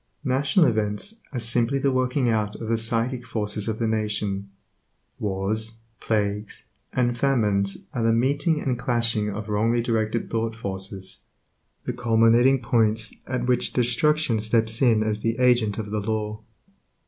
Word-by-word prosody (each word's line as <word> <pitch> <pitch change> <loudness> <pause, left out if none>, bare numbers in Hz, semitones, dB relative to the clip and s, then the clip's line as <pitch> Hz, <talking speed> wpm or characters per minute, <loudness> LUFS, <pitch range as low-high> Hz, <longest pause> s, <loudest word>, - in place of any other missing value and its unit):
National 140 +6 +3
events 110 - -1
are 135 - -4
simply 120 +3 +1
the 135 0 +1
working 130 0 +1
out 105 -2 0
of 110 - -6
the 115 - +2
psychic 115 +2 -1
forces 105 -3 -2
of 110 -1 -2
the 115 - -1
nation. 105 -3 -1 0.7
Wars, 105 +3 -1 0.2
plagues, 105 -1 -2 0.3
and 120 -1 +1
famines 105 -7 +1
are 120 - -2
the 115 0 +3
meeting 140 +7 +1
and 125 -4 -2
clashing 120 -3 0
of 105 +1 -5
wrongly 110 +3 +1
directed 115 -1 -1
thought 115 0 -2
forces, 95 -2 -6 0.7
the - - -2
culminating 115 +3 +4
points 110 -2 +1
at 125 -1 -2
which 125 0 +1
destruction 125 +1 +2
steps 110 +1 +1
in 115 -4 +4
as 110 -1 -1
the 115 +1 -1
agent 120 -5 +3
of 105 -2 -5
the 105 - -1
Law. 105 0 -3
115 Hz, 150 wpm, -24 LUFS, 105-125 Hz, 0.7 s, culminating